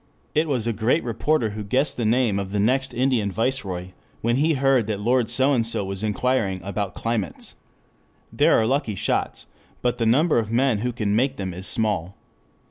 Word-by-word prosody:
It 155 Hz, +2 st, +2 dB
was 125 Hz, -7 st, 0 dB
a 115 Hz, -, 0 dB
great 115 Hz, +9 st, +1 dB
reporter 120 Hz, 0 st, 0 dB
who 105 Hz, 0 st, -5 dB
guessed 130 Hz, +8 st, 0 dB
the 120 Hz, -, -2 dB
name 115 Hz, -3 st, +2 dB
of 100 Hz, -1 st, -4 dB
the 100 Hz, +1 st, -2 dB
next 130 Hz, +5 st, +1 dB
Indian 120 Hz, -5 st, +1 dB
Viceroy 95 Hz, -6 st, -2 dB, 0.3 s
when 120 Hz, +2 st, +1 dB
he 155 Hz, +3 st, +2 dB
heard 135 Hz, -4 st, +2 dB
that 105 Hz, -2 st, -2 dB
Lord 120 Hz, +2 st, +1 dB
So 135 Hz, +2 st, +2 dB
and 120 Hz, -4 st, +2 dB
So 115 Hz, -3 st, -2 dB
was 95 Hz, 0 st, -5 dB
inquiring 110 Hz, -2 st, 0 dB
about 100 Hz, -1 st, -3 dB
climates. 115 Hz, -3 st, -3 dB, 0.8 s
There -, -, +4 dB
are 110 Hz, -, +2 dB
lucky 125 Hz, -4 st, 0 dB
shots -, -, -2 dB, 0.4 s
but 125 Hz, -1 st, +1 dB
the 115 Hz, -, 0 dB
number 145 Hz, +4 st, +3 dB
of 110 Hz, -1 st, -3 dB
men 125 Hz, -2 st, +2 dB
who 125 Hz, +3 st, -1 dB
can 105 Hz, -4 st, -1 dB
make 130 Hz, +4 st, +1 dB
them 95 Hz, -2 st, -4 dB
is 95 Hz, +3 st, -2 dB
small. 100 Hz, -5 st, 0 dB
115 Hz, 195 wpm, -23 LUFS, 100-130 Hz, 0.8 s, There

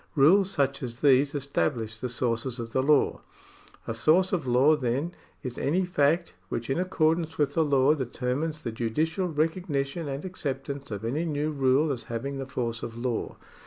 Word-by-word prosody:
Rules 180 Hz, +7 st, +5 dB
such 140 Hz, -6 st, 0 dB
as 120 Hz, -2 st, -6 dB
these 140 Hz, 0 st, +4 dB
establish 125 Hz, -5 st, -1 dB
the 125 Hz, -, -3 dB
sources 120 Hz, 0 st, -1 dB
of 115 Hz, -1 st, -5 dB
the 130 Hz, -, +1 dB
law. 145 Hz, +1 st, +3 dB, 0.6 s
A -, -, -3 dB
source 165 Hz, +11 st, +3 dB
of 160 Hz, -8 st, -1 dB
law, 130 Hz, +5 st, +5 dB
then, 135 Hz, +4 st, -1 dB, 0.3 s
is 125 Hz, -2 st, -5 dB
any 180 Hz, +6 st, +1 dB
fact 170 Hz, 0 st, +1 dB, 0.2 s
which 115 Hz, +3 st, -3 dB
in 135 Hz, -, 0 dB
accordance 160 Hz, -2 st, +1 dB
with 145 Hz, -2 st, +1 dB
the 165 Hz, -, +3 dB
law 140 Hz, -1 st, +4 dB
determines 140 Hz, +3 st, -2 dB
the 115 Hz, -, -3 dB
judicial 155 Hz, -, -1 dB
recognition 160 Hz, -1 st, -1 dB
and 140 Hz, +3 st, -4 dB
acceptance 140 Hz, -5 st, -4 dB
of 105 Hz, 0 st, -5 dB
any 140 Hz, +8 st, -1 dB
new 150 Hz, -1 st, -1 dB
rule 140 Hz, +2 st, +2 dB
as 120 Hz, -4 st, -4 dB
having 135 Hz, +5 st, -4 dB
the 135 Hz, -, -5 dB
force 120 Hz, -3 st, -3 dB
of 115 Hz, 0 st, -6 dB
law. 120 Hz, -1 st, -3 dB
140 Hz, 175 wpm, -27 LUFS, 125-155 Hz, 0.6 s, Rules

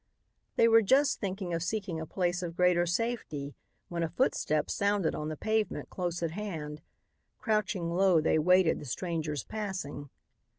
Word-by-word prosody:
They 230 Hz, -, +5 dB
were 225 Hz, 0 st, +7 dB
just 265 Hz, +6 st, +3 dB
thinking 190 Hz, -3 st, -3 dB
of 165 Hz, -, -1 dB
seeking 185 Hz, -3 st, -2 dB
a 160 Hz, -, -6 dB
place 180 Hz, 0 st, -1 dB
of 170 Hz, -2 st, -5 dB
greater 180 Hz, -1 st, +3 dB
safety 170 Hz, -8 st, -2 dB, 0.3 s
when 170 Hz, -1 st, -3 dB
a 165 Hz, -, 0 dB
footstep 155 Hz, -, +1 dB
sounded 200 Hz, -4 st, +1 dB
on 150 Hz, 0 st, -3 dB
the 155 Hz, -, -5 dB
pavement 220 Hz, +3 st, -1 dB
close 175 Hz, -2 st, -3 dB
at 165 Hz, -, -1 dB
hand. 160 Hz, -6 st, -5 dB, 0.6 s
Crouching 205 Hz, -6 st, 0 dB
low 185 Hz, -1 st, +4 dB
they 155 Hz, 0 st, +2 dB
waited 180 Hz, +1 st, +4 dB
the -, -, -9 dB
stranger's 155 Hz, -1 st, -3 dB
passing. 185 Hz, -9 st, -5 dB
175 Hz, 160 wpm, -30 LUFS, 160-205 Hz, 0.6 s, were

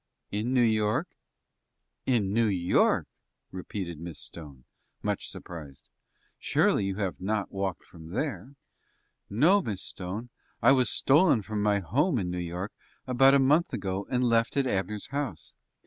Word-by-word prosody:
"In 105 Hz, +4 st, -1 dB
New 125 Hz, -2 st, +4 dB
York." 110 Hz, -2 st, +1 dB, 1.0 s
"In 110 Hz, -7 st, +2 dB
New 115 Hz, 0 st, +3 dB
York!" 90 Hz, -3 st, +2 dB, 0.5 s
repeated 90 Hz, -3 st, -5 dB
Miss 85 Hz, -2 st, -7 dB
Stone, 70 Hz, -7 st, -10 dB, 0.4 s
much -, -, -2 dB
surprised. 75 Hz, -6 st, -10 dB, 0.5 s
"Surely, -, -, +2 dB
you 95 Hz, -1 st, -2 dB
have 95 Hz, -3 st, -3 dB
not 105 Hz, +1 st, -1 dB
walked 95 Hz, -2 st, -3 dB
from 80 Hz, -2 st, -13 dB
there?" 140 Hz, -, -4 dB, 0.7 s
"No, 165 Hz, -, +4 dB
Miss 100 Hz, -, -4 dB
Stone; 100 Hz, +7 st, -6 dB, 0.3 s
I 120 Hz, -, +6 dB
was 130 Hz, -3 st, +4 dB
stolen 145 Hz, -, +4 dB
from 105 Hz, +1 st, -3 dB
my 105 Hz, -1 st, +2 dB
home 140 Hz, -, +1 dB
in 90 Hz, -5 st, -2 dB
New 90 Hz, -, -3 dB
York 90 Hz, +3 st, -4 dB, 0.3 s
about 135 Hz, +2 st, +5 dB
a -, -, +7 dB
month 145 Hz, +6 st, +3 dB
ago, 95 Hz, 0 st, -3 dB
and 125 Hz, 0 st, +1 dB
left 115 Hz, +2 st, +2 dB
at 140 Hz, -, +3 dB
Abner's 100 Hz, -2 st, -2 dB
house. 140 Hz, -, -4 dB
105 Hz, 145 wpm, -28 LUFS, 95-125 Hz, 1.0 s, a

